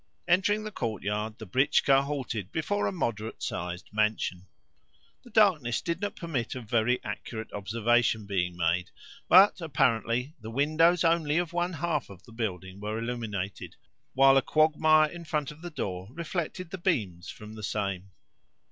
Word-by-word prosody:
Entering 200 Hz, +4 st, +3 dB
the 215 Hz, -, -5 dB
courtyard, 110 Hz, -, -3 dB
the 110 Hz, -, -8 dB
britchka 135 Hz, +5 st, +3 dB
halted 130 Hz, -9 st, -4 dB
before 205 Hz, +6 st, -1 dB
a -, -, 0 dB
moderate 115 Hz, -, -3 dB
sized 90 Hz, +1 st, -4 dB
mansion. 105 Hz, -4 st, 0 dB, 0.8 s
The 245 Hz, -, -14 dB
darkness 180 Hz, -, +3 dB
did 170 Hz, +1 st, -3 dB
not 205 Hz, -, -2 dB
permit 140 Hz, -10 st, -3 dB
of 125 Hz, -4 st, -7 dB
very 120 Hz, +3 st, +2 dB
accurate 110 Hz, +2 st, -6 dB
observation 110 Hz, +2 st, +1 dB
being 90 Hz, -3 st, -1 dB
made, 90 Hz, +1 st, 0 dB, 0.4 s
but, 190 Hz, +2 st, +7 dB
apparently, 125 Hz, -3 st, +1 dB
the 110 Hz, -, -7 dB
windows 155 Hz, +7 st, +3 dB
only 165 Hz, -2 st, +2 dB
of 175 Hz, -1 st, -1 dB
one 175 Hz, +1 st, 0 dB
half 160 Hz, -3 st, -2 dB
of 95 Hz, -2 st, -13 dB
the -, -, -16 dB
building 95 Hz, -4 st, -4 dB
were 105 Hz, +1 st, -3 dB
illuminated, 115 Hz, -5 st, -4 dB, 0.4 s
while 135 Hz, 0 st, +6 dB
a -, -, +5 dB
quagmire 155 Hz, +1 st, +4 dB
in 175 Hz, 0 st, -8 dB
front 150 Hz, -3 st, -2 dB
of 150 Hz, +1 st, -14 dB
the 175 Hz, -, -6 dB
door 95 Hz, -, -4 dB
reflected 170 Hz, +2 st, -4 dB
the 190 Hz, -, -5 dB
beams 100 Hz, -, -1 dB
from 105 Hz, 0 st, -10 dB
the 110 Hz, -, -9 dB
same. 100 Hz, -2 st, -3 dB
125 Hz, 155 wpm, -28 LUFS, 105-165 Hz, 0.8 s, but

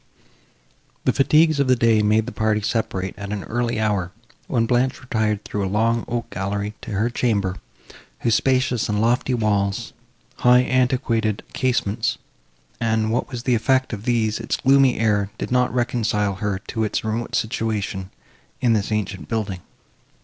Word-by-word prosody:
The -, -, +3 dB
fatigues 155 Hz, +2 st, +4 dB
of 140 Hz, -, +2 dB
the 130 Hz, -, +5 dB
day 115 Hz, -2 st, +3 dB
made 105 Hz, +1 st, +3 dB
the 125 Hz, -, -5 dB
party 110 Hz, -2 st, 0 dB
separate 100 Hz, -4 st, -2 dB
at 100 Hz, 0 st, -6 dB
an 105 Hz, -2 st, -3 dB
early 120 Hz, -1 st, -1 dB
hour, 100 Hz, -5 st, 0 dB, 0.4 s
when 115 Hz, -1 st, +1 dB
Blanche 125 Hz, +3 st, +1 dB
retired 110 Hz, -5 st, -1 dB
through 105 Hz, -, -3 dB
a 95 Hz, -, -1 dB
long 115 Hz, +3 st, +1 dB
oak 120 Hz, -1 st, -3 dB
gallery 100 Hz, +2 st, -3 dB
to -, -, -6 dB
her 110 Hz, +5 st, 0 dB
chamber, 100 Hz, -6 st, 0 dB, 0.6 s
whose 115 Hz, -, +2 dB
spacious 130 Hz, -1 st, +1 dB
and 105 Hz, 0 st, 0 dB
lofty 120 Hz, +3 st, +2 dB
walls, 100 Hz, -3 st, 0 dB, 0.4 s
high 125 Hz, 0 st, +5 dB
antiquated 125 Hz, -5 st, +1 dB
casements, 120 Hz, -4 st, 0 dB, 0.6 s
and, 110 Hz, -1 st, +1 dB
what 120 Hz, -, -1 dB
was 120 Hz, -2 st, -6 dB
the 125 Hz, -, +2 dB
effect 130 Hz, +2 st, +1 dB
of 105 Hz, +1 st, -6 dB
these, 115 Hz, -3 st, +1 dB
its 115 Hz, -, -2 dB
gloomy 135 Hz, -1 st, +4 dB
air, 105 Hz, -3 st, +1 dB
did -, -, -5 dB
not 125 Hz, 0 st, +2 dB
reconcile 115 Hz, -4 st, 0 dB
her 100 Hz, 0 st, -2 dB
to 110 Hz, -, -1 dB
its 105 Hz, -, -1 dB
remote 110 Hz, +2 st, -2 dB
situation, 105 Hz, -4 st, -2 dB, 0.5 s
in 120 Hz, -2 st, +3 dB
this 105 Hz, 0 st, 0 dB
ancient 100 Hz, -7 st, -2 dB
building. 100 Hz, -3 st, -2 dB
110 Hz, 160 wpm, -22 LUFS, 105-125 Hz, 0.6 s, the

